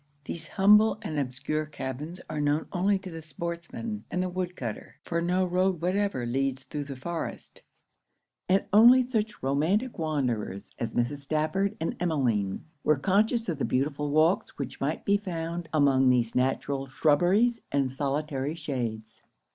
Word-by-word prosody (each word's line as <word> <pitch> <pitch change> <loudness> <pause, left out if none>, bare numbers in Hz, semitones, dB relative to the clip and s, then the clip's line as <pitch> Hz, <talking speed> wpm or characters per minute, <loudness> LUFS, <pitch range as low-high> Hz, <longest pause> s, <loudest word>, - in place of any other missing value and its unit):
These 165 +2 -6
humble 210 +3 +5
and 155 -2 -2
obscure 145 +3 -2
cabbins 150 +4 -6
are 155 -1 -3
known 145 +2 +1
only 195 +2 +2
to 190 -1 -9
the 165 0 -7
sportsman 170 +7 -5
and 180 - -1
the 185 - -2
woodcutter; 180 - -5
for 170 0 -1
no 180 +2 +1
road 185 0 +1
whatever 185 -6 0
leads 135 +2 -1
through 145 0 -5
the 140 -1 -6
forest: 165 +6 -6 0.9
and 190 +1 +3
only 240 +4 +8
such 220 - -2
romantic 170 - +1
wanderers 125 - -2
as 115 -1 -3
Mrs. 120 +4 0
Stafford 155 +8 -1
and 160 - -2
Emmeline, 125 - 0 0.2
were 150 - +3
conscious 215 - +2
of 165 -5 -2
the - - 0
beautiful 145 +2 0
walks 155 +5 +2
which 135 -3 -6
might 145 +3 -2
be 200 0 +4
found 170 -3 -4
among 135 -4 +4
these 120 -2 +2
natural 135 +1 0
shrubberies 175 - +3
and 135 -2 +1
solitary 140 +1 -2
shades. 115 -8 -4
155 Hz, 150 wpm, -28 LUFS, 135-185 Hz, 0.9 s, only